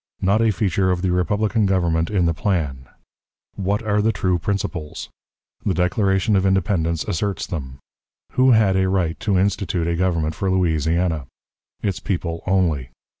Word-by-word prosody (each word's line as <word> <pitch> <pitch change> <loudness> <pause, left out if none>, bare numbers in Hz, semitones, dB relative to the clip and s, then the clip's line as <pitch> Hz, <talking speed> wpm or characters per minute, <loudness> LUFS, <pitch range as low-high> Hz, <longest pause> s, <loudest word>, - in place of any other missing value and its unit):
Not 100 +4 +2
a 115 - +3
Feature 95 -1 0
of 90 0 0
the 95 - +1
Republican 105 +4 +1
Government 85 -3 +1
in 95 -4 +1
the 85 - +2
Plan. 75 -9 -2 0.6
What 100 +3 -1
are 105 -1 +1
the 110 +2 +2
True 95 -3 0
Principles? 90 -4 -4 0.5
The 95 - 0
Declaration 95 +3 +1
of 95 - +3
Independence 95 -4 +1
asserts 100 +1 -2
them. 65 -6 -6 0.5
Who 130 +1 +3
had 105 -4 +4
a 95 0 +2
Right 90 -4 0
to 100 -3 +1
institute 95 -3 0
a 85 - 0
Government 85 -3 0
for 95 +4 -2
Louisiana? 80 -3 +1 0.6
Its 100 -4 -1
People 85 -3 -3
only. 85 -9 +1
95 Hz, 155 wpm, -21 LUFS, 85-100 Hz, 0.6 s, had